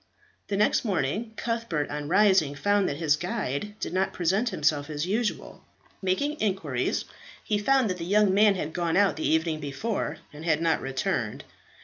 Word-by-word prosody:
The 200 - -1
next 210 - +3
morning, 210 - -1
Cuthbert 230 -13 -2
on 145 0 -4
rising 190 -5 +4
found 205 +5 +2
that 140 - -3
his 155 -2 +2
guide 180 - -3
did - - -4
not 190 +1 0
present 195 +7 +1
himself 150 -5 0
as 150 +1 -2
usual. 215 +4 -2 0.4
Making 285 +12 -1
inquiries, 185 - -1 0.4
he 210 - 0
found 265 +3 +3
that 185 -2 -2
the - - -4
young 200 +1 +3
man 205 0 +5
had 160 -4 -4
gone 170 0 0
out 200 -1 +4
the 155 - -1
evening 160 0 +1
before, 150 +3 -3 0.2
and 150 +2 -9
had 160 -2 +2
not 165 -1 +1
returned. 135 0 -2
185 Hz, 170 wpm, -27 LUFS, 150-210 Hz, 0.4 s, man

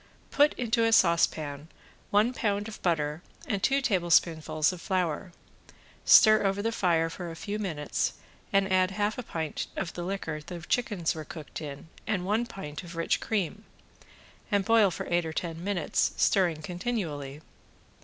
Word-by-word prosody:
Put 290 +1 +4
into 235 -1 +1
a 225 - +3
saucepan 160 -6 +2 0.4
one 215 +5 +3
pound 205 -3 -1
of 220 - -9
butter 155 -2 0 0.2
and 205 -9 -2
two 275 +5 +2
tablespoonfuls 170 - +2
of 175 - -9
flour, 180 -1 -1 0.7
stir 215 -1 +7
over 195 +1 0
the 225 - 0
fire 170 -6 +2
for 170 +1 -6
a 165 - -7
few 210 +3 -4
minutes 160 -8 -2 0.4
and 195 -1 +2
add 185 0 +4
half 205 +3 -1
a - - -1
pint 160 -9 -4
of 175 -4 -3
the 175 - -5
liquor 170 -5 -4
the 175 +3 -8
chickens 195 -2 0
were 155 - -6
cooked 155 0 -8
in 145 0 -7 0.2
and 195 -4 -1
one 220 +5 0
pint 150 -10 -7
of 175 -1 -10
rich 165 - 0
cream, 210 -1 -2 0.9
and 200 -2 +1
boil 225 -3 +5
for 175 - -5
eight 175 0 +1
or 160 -1 -5
ten 165 0 -4
minutes, 195 -4 0
stirring 170 -5 +2
continually. 160 - -4
180 Hz, 165 wpm, -28 LUFS, 160-210 Hz, 0.9 s, stir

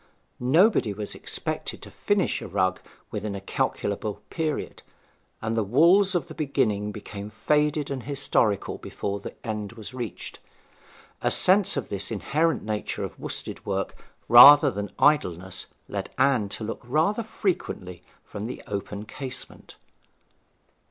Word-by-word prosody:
Nobody 140 - +3
was 105 0 -5
expected - - -4
to - - -11
finish - - 0
a - - -6
rug 95 0 0 0.3
within 105 -2 -4
a - - -4
calculable 100 +1 -2
period, 160 -3 -3 0.6
and 110 0 -1
the 115 - +2
wools 175 - +4
of 175 - 0
the - - -10
beginning 105 -9 0
became 105 0 -8
faded 150 +6 0
and 135 -2 -3
historical 120 -6 0
before 100 0 -4
the - - -8
end 105 -1 -4
was 110 -1 -9
reached. 120 -3 -6 0.8
A - - +2
sense 190 -3 +5
of 140 - -3
this 100 -1 -3
inherent 155 +9 0
nature 105 -1 -3
of - - -7
worsted - - -4
work - - -2 0.3
rather 140 +4 +10
than 105 -2 -4
idleness 95 - +1 0.2
led - - -4
Anne 125 -8 +2
to 110 - -4
look 110 +1 -5
rather 160 - +1
frequently 175 - -3 0.2
from 105 +2 -6
the 125 - -7
open 100 +1 -5
casement. 130 +2 -7
115 Hz, 140 wpm, -26 LUFS, 105-150 Hz, 0.8 s, rather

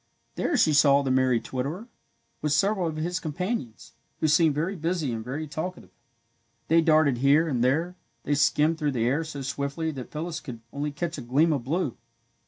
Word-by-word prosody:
There - - 0
she 155 - +4
saw 140 -1 +5
the 135 - 0
merry 130 -2 +3
twitterer, 145 - -4 0.5
with 150 -1 0
several 195 +2 +2
of 160 - -4
his 175 +4 -2
companions, 155 - -4 0.3
who 155 - +2
seemed 155 0 +4
very 170 +7 -1
busy 165 -5 -1
and 110 -1 -4
very 140 +6 -4
talkative. 155 +5 -6 0.8
They 165 +1 +5
darted 155 -6 +3
here 145 +5 +4
and 125 -6 0
there, 160 +8 +1 0.3
they 145 - 0
skimmed 150 +3 +2
through 150 -2 0
the 115 -2 0
air 140 +7 +1
so 145 -3 -6
swiftly 140 +4 -3
that 130 -4 -8
Phyllis 160 +1 -4
could 125 -7 -8
only 145 +1 -2
catch 165 +3 -4
a - - -6
gleam 145 +7 +2
of 135 -5 -2
blue. 155 -2 -1
150 Hz, 190 wpm, -26 LUFS, 135-165 Hz, 0.8 s, saw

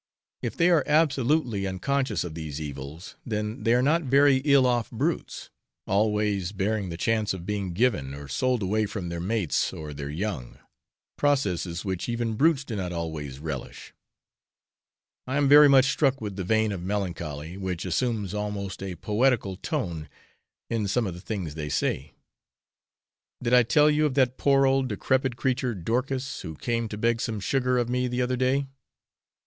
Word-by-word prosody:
If - - -4
they 175 +1 +4
are 165 -4 +4
absolutely 140 -8 +2
unconscious 135 +9 -1
of 85 -3 -6
these 80 -2 -6
evils, 75 +3 -7
then 105 +2 -3
they 115 +1 +3
are 125 - +3
not 160 +5 +3
very 140 -1 +4
ill 140 -1 +4
off 120 -2 +1
brutes, - - -3 0.3
always 105 -2 +1
barring 100 0 -1
the 85 - -5
chance 110 0 0
of 85 -2 -8
being 100 -2 -2
given 85 - 0
or 70 0 -9
sold 125 - 0
away 105 +3 +1
from 95 -3 -5
their 85 0 -4
mates 95 -2 0
or 75 -1 -7
their 70 0 -6
young 80 - -4 0.6
processes 95 - 0
which 95 +2 -3
even 115 -1 -1
brutes 145 +4 +3
do 120 -5 -5
not 90 -3 -3
always 80 -5 -4
relish. 70 -3 -7 1.3
I 130 +2 -1
am 145 -1 +3
very 145 +1 +8
much 135 0 +6
struck 135 -3 +2
with 105 -3 -5
the 95 - -3
vein 110 +3 +2
of 95 -3 -4
melancholy, 85 -5 -4
which 95 -2 -4
assumes 105 +2 -1
almost 105 -2 -4
a 95 -2 -4
poetical 105 +1 +1
tone 90 - -4 0.6
in 110 -3 -1
some 115 +4 +1
of 95 - -3
the 90 - -10
things 95 -7 -4
they 75 -1 -5
say. 70 0 -2 1.2
Did 120 0 -1
I 125 - +8
tell 135 +6 +4
you 150 +1 +3
of 135 - -4
that 130 -2 +2
poor 135 -1 +4
old 135 0 +2
decrepid 130 +3 0
creature 130 -2 0
Dorcas, 130 +8 -2
who 80 -3 -7
came 115 +4 -2
to 105 - -5
beg 115 +1 +1
some 110 -2 -2
sugar 125 +5 +1
of 120 -1 +1
me 125 +1 0
the 125 0 -1
other 125 +1 0
day? 130 +2 +1
110 Hz, 175 wpm, -26 LUFS, 90-130 Hz, 1.3 s, very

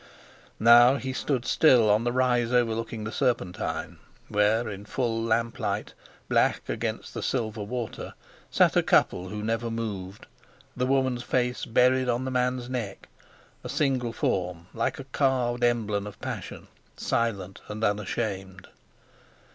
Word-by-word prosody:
Now 120 +3 +7
he 130 -1 -4
stood 130 -2 -1
still 125 -8 +5
on 105 +3 +3
the 120 - +1
rise 125 -2 +2
overlooking 115 -2 0
the 110 - -4
Serpentine, 115 -10 -2 0.3
where, 105 +3 +2
in 100 -1 -6
full 115 -1 -1
lamp 115 +1 0
light, 115 - -2 0.3
black - - +2
against - - -3
the - - -4
silver 110 -4 -2
water, 115 +2 -5 0.3
sat - - +3
a - - +5
couple 90 +1 +2
who 105 +2 -5
never 115 +1 -1
moved, 105 -4 -5 0.5
the 125 0 0
woman's 130 -2 +1
face 125 0 -1
buried 125 +2 +3
on 120 +2 0
the 130 - -3
man's 125 -1 0
neck—a 120 -6 -8
single 130 -5 0
form, 90 -6 -2
like 125 +3 -1
a 135 - -6
carved 130 -3 0
emblem 105 -4 +1
of 105 - -10
passion, - - -6 0.3
silent 100 -5 -2
and 105 +1 -5
unashamed. 100 -2 -2
115 Hz, 140 wpm, -27 LUFS, 105-125 Hz, 0.5 s, Now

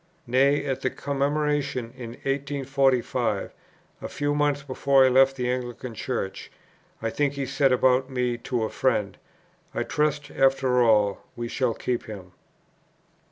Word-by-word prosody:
Nay, 135 +3 +3
at 135 -1 -2
the 130 - +1
Commemoration 145 -1 -1
of - - -25
1845, 135 -3 -1 0.5
a - - -4
few 145 0 -1
months 145 -1 +1
before 135 0 +3
I - - +5
left 135 +1 +5
the 125 -2 -2
Anglican 125 -1 -4
Church, 110 -4 -4 0.5
I 115 - -1
think 145 +2 0
he 140 -1 -3
said 135 0 +2
about 130 +1 +3
me 125 -2 -1
to 120 -1 -2
a 110 - -1
friend, 105 -7 0 0.6
"I - - 0
trust 150 -1 -1
after 135 -2 +3
all 105 -4 +3 0.2
we 120 0 -4
shall 120 -1 -1
keep 125 -1 -2
him." 95 -4 -9
130 Hz, 145 wpm, -25 LUFS, 120-140 Hz, 0.6 s, I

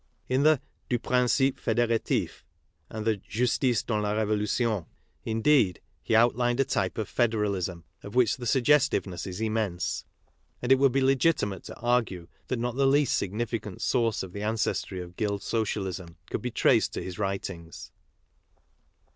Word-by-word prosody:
In 130 +1 +1
the 155 -1 +5 0.3
Dm 120 -2 0
Principe 130 +2 +2
Federatif 115 -2 0 0.5
and 110 -1 -5
the 110 -2 +2
Justice 120 +3 0
dans 110 -2 -1
la 105 0 -1
Revolu 105 -1 0
tion, 110 -8 0 0.4
indeed, 115 - +3 0.2
he 110 - 0
outlined 120 +2 +3
a 135 - +4
type 95 -6 -1
of 110 -3 -2
federalism 100 -7 0 0.2
of 100 - -9
which 125 -3 +3
the 120 -2 -5
suggestiveness 125 - +2
is 90 +1 -6
immense; 110 -5 -1 0.6
and 125 - -2
it 135 - +6
would 135 -1 +5
be 135 +2 +1
legitimate 130 -7 +1
to - - -8
argue 115 -8 0 0.2
that 130 - -1
not 120 +1 -2
the 135 -1 +4
least 140 0 +3
significant 105 0 -3
source 115 -6 +1
of 95 -1 -9
the 100 - -5
ancestry 105 -3 -1
of 90 0 -9
Guild 100 -2 -1
Socialism 95 -6 -3
could - - -2
be 125 - -2
traced - - +3
to - - -4
his 90 +1 -7
writings. 95 -4 -4
110 Hz, 155 wpm, -27 LUFS, 100-125 Hz, 0.6 s, it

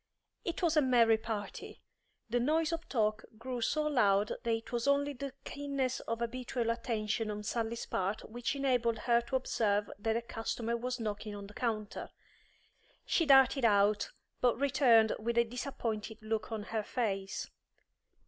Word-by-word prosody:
It 345 0 -3
was 330 -2 +3
a 305 - +6
merry 235 -4 +4
party. 215 -3 -6 0.4
The 240 +2 +1
noise 315 +6 +2
of 330 +1 -5
talk 215 -3 +1
grew 250 +1 -4
so 305 +6 +1
loud 210 -8 +3
that 235 - -1
it 225 +2 -2
was 240 +1 -1
only 285 +1 +2
the 275 +1 -5
keenness 275 -3 -2
of 230 0 -4
habitual 240 0 -1
attention 225 -2 -1
on 210 0 -4
Sally's 230 +1 -2
part 195 +3 -2
which 240 +4 -3
enabled 250 -4 +1
her 235 +1 +3
to 240 +3 -4
observe 210 -5 +1
that 225 +2 0
a 235 - -3
customer 230 0 -3
was 250 +2 -3
knocking 210 -1 -4
on 200 0 -7
the 205 - -12
counter. 215 -3 -3 1.0
She 330 - +2
darted 270 -1 +6
out, 205 - +4 0.3
but 245 -1 +3
returned 250 -5 +5
with 235 +2 -2
a 235 - +6
disappointed 230 -3 -4
look 220 0 -2
on 220 -2 -3
her 220 - +1
face. 195 -4 -2
235 Hz, 160 wpm, -33 LUFS, 220-255 Hz, 1.0 s, a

